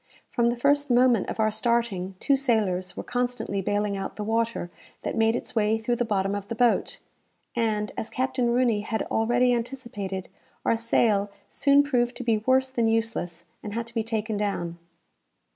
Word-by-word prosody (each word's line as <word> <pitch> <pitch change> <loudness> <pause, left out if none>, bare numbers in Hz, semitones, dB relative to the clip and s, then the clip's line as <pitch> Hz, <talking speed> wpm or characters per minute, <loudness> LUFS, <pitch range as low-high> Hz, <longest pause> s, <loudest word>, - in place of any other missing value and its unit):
From 235 -1 +2
the 240 - 0
first 285 +3 +2
moment 245 -3 +4
of - - -5
our 215 0 +3
starting, 215 -5 0
two 280 - +3
sailors 200 -9 0
were - - -4
constantly 245 -5 -2
baling 205 +1 0
out 195 0 -4
the 210 - -4
water 225 -4 -1 0.3
that - - -2
made 225 0 +3
its - - -5
way 220 0 +2
through 240 +2 -1
the 240 - +1
bottom 195 -2 0
of 200 -1 -4
the 230 - -4
boat; 240 +1 +2 0.6
and, 215 -3 0
as 220 - -4
Captain 255 -1 0
Rooney 235 -3 +2
had 220 +1 -2
already 240 +2 +3
anticipated, 230 -6 -4 0.4
our - - +3
sail 220 -3 +2 0.2
soon 280 0 +4
proved 245 -4 +1
to 250 - -5
be 225 -3 +2
worse 260 +3 +2
than 235 -3 +1
useless, 225 -7 -1 0.2
and 205 - -6
had 235 0 -2
to 235 - -8
be 230 - 0
taken 220 -1 -2
down. 175 -5 -2
225 Hz, 180 wpm, -26 LUFS, 205-245 Hz, 0.6 s, moment